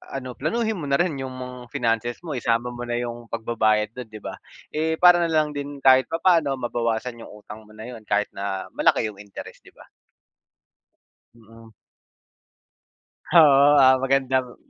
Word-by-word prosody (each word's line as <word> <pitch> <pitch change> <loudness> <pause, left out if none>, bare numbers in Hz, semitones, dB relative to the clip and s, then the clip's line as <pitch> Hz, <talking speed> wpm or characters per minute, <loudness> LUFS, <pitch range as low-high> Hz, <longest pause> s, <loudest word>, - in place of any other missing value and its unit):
ano, 130 -2 -5
planuhin 220 - -1
mo 150 - -5
narin 145 +2 0
yung 130 -1 -6
mga 125 0 -8 0.2
finances 120 -2 -1
mo, 165 - -6
isama 120 0 0
mo 120 0 -7
na 120 - -3
yung 120 0 -5
pagbabayad 110 -2 0
dun, 125 0 -9
'di 110 -1 -12
ba? - - -7 0.3
Eh 160 +1 -1
para 175 +1 +6
nalang 160 -3 +1
din 145 -1 -7
kahit 130 -1 +6
papaano 165 -4 +2
mabawasan 120 -1 -3
yung - - -11
utang 110 +1 -11
mo 110 - -18
na 110 +3 -9
yun 120 -3 -10
kahit 105 0 0
na 100 -1 -5
malaki 110 - +1
yung 100 - -18
interest, 100 -1 -11
'di - - -18
ba? - - -17 1.5
Mm. 115 0 -17 1.5
Oo, 145 -5 +6 0.2
ah, 130 0 +6
magandang 130 -1 0
125 Hz, 160 wpm, -23 LUFS, 115-140 Hz, 1.5 s, para